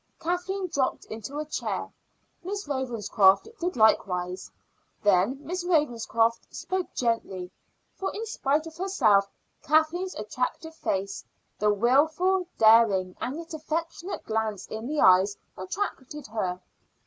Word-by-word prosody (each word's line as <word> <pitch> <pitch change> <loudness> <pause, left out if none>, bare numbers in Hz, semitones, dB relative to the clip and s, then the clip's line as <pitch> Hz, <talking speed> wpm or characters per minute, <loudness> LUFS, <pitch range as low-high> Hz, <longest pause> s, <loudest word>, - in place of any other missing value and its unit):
Kathleen 360 +3 -2
dropped 275 -6 -1
into 225 +6 -6
a 305 - -2
chair. 300 - -3 0.5
Miss 400 0 -4
Ravenscroft 230 - +2
did 355 -2 -2
likewise. 185 -5 +2 0.5
Then 205 +5 +3
Miss 360 +1 -3
Ravenscroft 235 -8 +1
spoke 370 -1 -3
gently, 195 -7 -1 0.4
for 385 - -3
in 440 +2 -4
spite 310 - 0
of 325 0 -10
herself 215 - +3 0.3
Kathleen's 315 +5 +1
attractive 250 +9 -3
face, 195 -9 -3 0.4
the 210 0 +3
wilful, 310 - +2
daring, 220 -5 +5
and 260 +5 -3
yet 335 0 -8
affectionate 330 +4 -4
glance 220 -2 -2
in 220 +2 -6
the 300 +1 -2
eyes, 190 +2 +5 0.2
attracted 290 - -5
her. 190 -5 -3
260 Hz, 120 wpm, -27 LUFS, 210-335 Hz, 0.5 s, daring